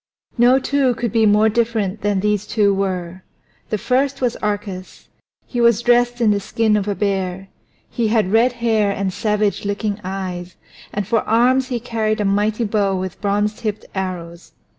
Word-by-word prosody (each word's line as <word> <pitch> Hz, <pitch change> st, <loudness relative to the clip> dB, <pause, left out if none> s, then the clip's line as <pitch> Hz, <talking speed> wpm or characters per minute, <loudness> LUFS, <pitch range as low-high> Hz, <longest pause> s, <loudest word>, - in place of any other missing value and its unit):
No 245 Hz, +2 st, +5 dB
two 270 Hz, -2 st, +1 dB
could 235 Hz, -2 st, -2 dB
be 220 Hz, 0 st, +3 dB
more 210 Hz, +1 st, +4 dB
different 220 Hz, -3 st, 0 dB
than 205 Hz, -2 st, 0 dB
these 210 Hz, -1 st, 0 dB
two 205 Hz, -3 st, +2 dB
were. 185 Hz, -2 st, -3 dB, 0.5 s
The 215 Hz, -, 0 dB
first 260 Hz, +5 st, 0 dB
was 245 Hz, -2 st, 0 dB
Arcas. 205 Hz, -3 st, -5 dB, 0.4 s
He 245 Hz, -, -3 dB
was 235 Hz, -1 st, +4 dB
dressed 245 Hz, 0 st, +3 dB
in 225 Hz, -3 st, +3 dB
the 205 Hz, -, +1 dB
skin 215 Hz, +2 st, +1 dB
of 205 Hz, -1 st, -1 dB
a 205 Hz, -, -1 dB
bear; 195 Hz, -1 st, -2 dB, 0.4 s
he 235 Hz, -2 st, -1 dB
had 215 Hz, -4 st, +1 dB
red 235 Hz, +3 st, +4 dB
hair 225 Hz, -4 st, +1 dB
and 195 Hz, -1 st, -2 dB
savage 210 Hz, 0 st, 0 dB
looking 205 Hz, 0 st, -2 dB
eyes, 185 Hz, -2 st, -5 dB, 0.4 s
and 205 Hz, -1 st, -3 dB
for 230 Hz, 0 st, +2 dB
arms 250 Hz, +4 st, +3 dB
he 245 Hz, -3 st, -2 dB
carried 220 Hz, -2 st, -1 dB
a 210 Hz, -, 0 dB
mighty 210 Hz, +3 st, +1 dB
bow 205 Hz, -3 st, +1 dB
with 185 Hz, -1 st, -5 dB
bronze 205 Hz, +1 st, 0 dB
tipped 215 Hz, -1 st, -4 dB
arrows. 175 Hz, -3 st, -5 dB
210 Hz, 175 wpm, -19 LUFS, 195-235 Hz, 0.5 s, No